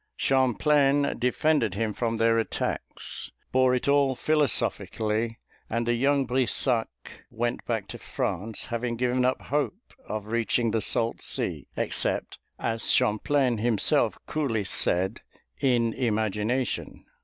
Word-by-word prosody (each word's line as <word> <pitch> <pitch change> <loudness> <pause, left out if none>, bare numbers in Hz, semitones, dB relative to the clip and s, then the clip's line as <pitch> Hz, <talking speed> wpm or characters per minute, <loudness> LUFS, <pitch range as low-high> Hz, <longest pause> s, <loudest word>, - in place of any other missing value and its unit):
Champlain 140 +2 +2
defended 125 - +1
him 110 0 -1
from 115 +1 -2
their 115 0 +3
attacks, 110 - -2 0.2
bore 130 0 +3
it 125 - -2
all 140 -2 +3
philosophically, 115 -6 0 0.3
and 115 +1 -1
the 120 - +1
young 135 +3 +2
Brissac 125 -1 0 0.4
went 120 +1 -2
back 110 -4 -2
to - - -7
France, 110 +5 -3
having 120 0 -2
given 125 +1 0
up 130 - +1
hope 150 - -3
of 105 -1 -4
reaching 115 +1 0
the 110 0 0
salt 115 +2 +1
sea, - - -1
except, - - 0 0.2
as 115 0 0
Champlain 125 +2 +2
himself 115 -2 +2
coolly 130 -9 -1
said, 95 +2 +1 0.4
"in 120 -4 +2
imagination." 110 +1 -1
120 Hz, 120 wpm, -26 LUFS, 110-130 Hz, 0.4 s, their